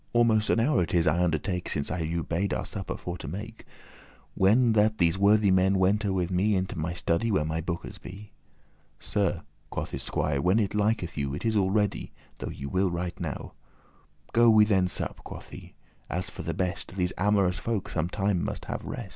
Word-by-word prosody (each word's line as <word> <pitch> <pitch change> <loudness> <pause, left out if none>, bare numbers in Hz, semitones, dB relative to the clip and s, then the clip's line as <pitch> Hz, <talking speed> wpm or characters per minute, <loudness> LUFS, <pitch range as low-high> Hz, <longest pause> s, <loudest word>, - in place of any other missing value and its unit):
Almost 115 -2 +3
an - - +3
hour 120 -3 +3
it 85 0 -1
is, 85 -1 +3
I 85 +3 +2
undertake, 90 +2 -1
Since 75 -1 -1
I 90 - -2
you 85 +1 -2
bade 95 +5 -1
our - - -3
supper 95 -2 -5
for 90 0 -6
to - - -7
make, 105 +8 -7 0.7
When 115 +5 +4
that 110 0 +3
these 85 -3 +3
worthy 100 +1 +4
men 95 +1 +4
wente 100 +2 +2
with 90 -1 -1
me 100 +3 +2
Into 95 0 -2
my 80 +2 -2
study, 85 +6 0
where 95 -8 +1
my 80 +1 -2
bookes 85 +1 -5
be." 100 +3 -10 0.7
"Sir," - - -1 0.3
quoth - - -4
this 65 - -4
squier, 70 -2 0
"when 90 +7 +3
it 100 -3 +1
liketh 105 -6 0
you. 70 0 -2
It 75 - -6
is 110 -1 +1
all 95 -2 +3
ready, 105 0 0 0.3
though - - -4
ye 70 - -7
will 95 +6 +1
right 85 +1 -4
now." - - -5 0.8
"Go 120 0 +6
we 110 -1 +7
then 95 -3 +2
sup," - - -4
quoth - - -10
he, - - -11 0.3
"as 90 +2 -2
for - - -7
the - - -3
best; 90 0 -3
These 90 -2 0
amorous 100 -2 +2
folk 115 -4 -2
some 80 +1 -2
time 100 -2 0
must - - -4
have - - -4
rest." - - -6
95 Hz, 205 wpm, -27 LUFS, 85-105 Hz, 0.8 s, we